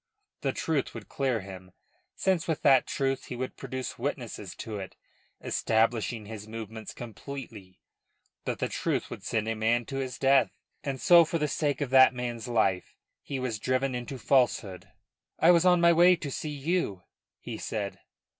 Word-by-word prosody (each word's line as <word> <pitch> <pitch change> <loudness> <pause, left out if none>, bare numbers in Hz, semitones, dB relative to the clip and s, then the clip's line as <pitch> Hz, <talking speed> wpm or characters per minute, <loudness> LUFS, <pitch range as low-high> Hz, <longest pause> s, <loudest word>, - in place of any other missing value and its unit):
The 135 - 0
truth 145 -2 -1
would 115 -2 -8
clear 130 -5 0
him 95 -1 -11 0.4
since 185 -4 +1
with 160 -3 -1
that 135 -2 +5
truth 135 -1 -1
he 125 - -6
would 130 +1 -4
produce 130 -1 -5
witnesses - - -4
to 110 -2 -6
it, 95 - -8 0.5
establishing 115 0 0
his 105 0 -8
movements 110 0 -7
completely. 115 -5 -9 0.6
But - - -2
the - - -1
truth - - -2
would - - -7
send 110 +1 -1
a 115 - 0
man 115 +2 +1
to 135 - -5
his 130 -2 -3
death; 135 0 +3 0.3
and 135 -2 -3
so 170 +3 +7
for 165 +1 -1
the 150 -2 0
sake 145 0 -1
of 135 -3 -2
that 130 -1 +7
man's 120 -1 -4
life 100 -6 0 0.3
he 140 - -5
was 125 -4 -3
driven 130 +3 0
into 125 +2 -5
falsehood. 110 -6 +1 0.5
"I 165 +3 +6
was 170 0 +4
on 180 -1 +6
my 170 0 +6
way 175 +2 +6
to 155 -4 -6
see 155 - -4
you," 145 - -1 0.4
he - - -7
said. 100 -3 -4
125 Hz, 175 wpm, -28 LUFS, 110-140 Hz, 0.6 s, so